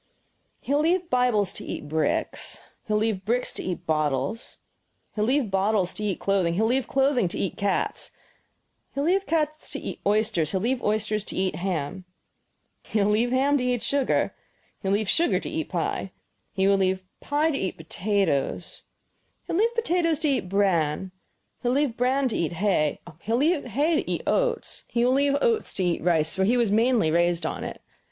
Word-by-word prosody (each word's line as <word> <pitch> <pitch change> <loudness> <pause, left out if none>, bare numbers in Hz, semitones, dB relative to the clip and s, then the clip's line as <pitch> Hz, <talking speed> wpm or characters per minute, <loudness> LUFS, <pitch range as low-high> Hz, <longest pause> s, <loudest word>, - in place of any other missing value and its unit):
"He 280 - -2
will 290 - +3
leave 345 +2 +1
Bibles 245 -6 +2
to - - -8
eat 150 - -6
bricks, 155 +1 -1 0.3
he - - -4
will 210 - +2
leave 215 -4 0
bricks 240 +5 0
to - - -5
eat 180 -1 -4
bottles, 155 - -1 0.6
he 210 - -2
will 215 - +2
leave 260 -5 +1
bottles 195 -1 +1
to 210 - -6
eat 200 -3 -1
clothing, 190 -4 +1
he 200 - +1
will 220 - +2
leave 260 +1 +1
clothing 270 -6 +2
to 180 - -5
eat 190 - -2
cats, 200 -1 -1 0.9
he - - -2
will 285 - +1
leave 380 +3 +2
cats 310 -1 -1
to - - -3
eat - - -6
oysters, 205 -7 +2
he 190 - -1
will 185 - -3
leave 250 +2 0
oysters 215 0 0
to - - -6
eat 185 0 0
ham, 180 -1 -3 0.8
he - - -3
will 205 +1 +3
leave 225 +3 +2
ham 275 +3 +2
to - - -1
eat 250 -2 0
sugar, 280 0 +1 0.5
he 195 - -4
will 195 - +3
leave 215 0 -1
sugar 335 - +2
to - - -7
eat - - -3
pie, - - -2 0.4
he 190 -1 +1
will 200 0 +4
leave 190 -1 +1 0.2
pie 300 +3 +1
to 275 - -2
eat 190 - -3
potatoes, 190 -8 -1 0.6
he - - -4
will 340 - +1
leave 465 +2 +2
potatoes 350 -8 +1
to 310 +1 -1
eat 265 -10 0
bran; 185 -3 +1 0.5
he - - -2
will 245 - +2
leave 280 -5 +1
bran 260 +3 +2
to 235 - -3
eat 170 0 -1
hay, 170 -5 +1 0.2
he 220 - -6
will 230 - +3
leave 305 +3 +2
hay 290 +7 +1
to - - -9
eat - - -2
oats, - - 0
he 235 0 +1
will 250 - +3
leave 280 +1 +3
oats 455 -2 +2
to 190 - 0
eat 175 -2 0
rice, 160 -2 +2
for 190 - 0
he 235 +6 +3
was 235 -4 +2
mainly 225 -5 +3
raised 175 +1 +2
on - - -3
it. - - -7
215 Hz, 210 wpm, -25 LUFS, 190-275 Hz, 0.9 s, will